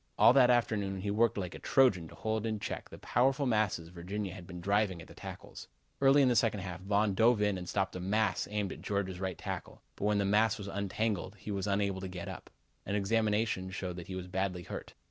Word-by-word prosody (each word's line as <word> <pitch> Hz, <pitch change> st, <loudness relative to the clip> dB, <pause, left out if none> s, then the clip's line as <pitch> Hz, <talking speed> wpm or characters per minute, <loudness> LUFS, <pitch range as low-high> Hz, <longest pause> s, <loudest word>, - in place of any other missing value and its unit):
All -, -, +7 dB
that 130 Hz, -2 st, +6 dB
afternoon 105 Hz, -5 st, +1 dB
he 100 Hz, +1 st, -1 dB
worked 115 Hz, +2 st, +2 dB
like 90 Hz, -3 st, -3 dB
a -, -, -8 dB
Trojan 110 Hz, -11 st, +3 dB
to -, -, -13 dB
hold 110 Hz, 0 st, -1 dB
in 110 Hz, -1 st, -1 dB
check -, -, -5 dB
the -, -, -10 dB
powerful 135 Hz, +4 st, +2 dB
masses 105 Hz, -8 st, +1 dB
Virginia 90 Hz, +2 st, -5 dB
had 90 Hz, -2 st, -10 dB
been 90 Hz, -1 st, -7 dB
driving 100 Hz, 0 st, +1 dB
at 85 Hz, -, -10 dB
the -, -, -13 dB
tackles. -, -, -9 dB, 0.3 s
Early 140 Hz, +1 st, +6 dB
in -, -, +5 dB
the 125 Hz, -, +3 dB
second 110 Hz, -4 st, +2 dB
half 90 Hz, -2 st, -5 dB
Von 100 Hz, +1 st, +2 dB
dove 115 Hz, +3 st, +4 dB
in 105 Hz, -1 st, +2 dB
and 90 Hz, -1 st, -6 dB
stopped 95 Hz, -1 st, -1 dB
a -, -, -3 dB
mass 95 Hz, 0 st, +1 dB
aimed 105 Hz, -2 st, -2 dB
at -, -, -11 dB
Georgia's 95 Hz, -3 st, -2 dB
right 95 Hz, -2 st, -3 dB
tackle, -, -, -6 dB
but -, -, -3 dB
when 105 Hz, 0 st, +3 dB
the 100 Hz, -, +1 dB
mass 105 Hz, +3 st, +3 dB
was 100 Hz, -2 st, -7 dB
untangled, 100 Hz, 0 st, -2 dB
he 105 Hz, +1 st, -7 dB
was 100 Hz, 0 st, -2 dB
unable 100 Hz, -1 st, 0 dB
to 95 Hz, -, -4 dB
get 90 Hz, -1 st, -6 dB
up. -, -, -8 dB, 0.3 s
An 100 Hz, -, -2 dB
examination 105 Hz, -1 st, +1 dB
showed 90 Hz, -1 st, -4 dB
that 85 Hz, -, -7 dB
he 95 Hz, -, -5 dB
was 95 Hz, -1 st, -5 dB
badly 95 Hz, -1 st, -2 dB
hurt. -, -, -8 dB
100 Hz, 235 wpm, -32 LUFS, 95-110 Hz, 0.3 s, All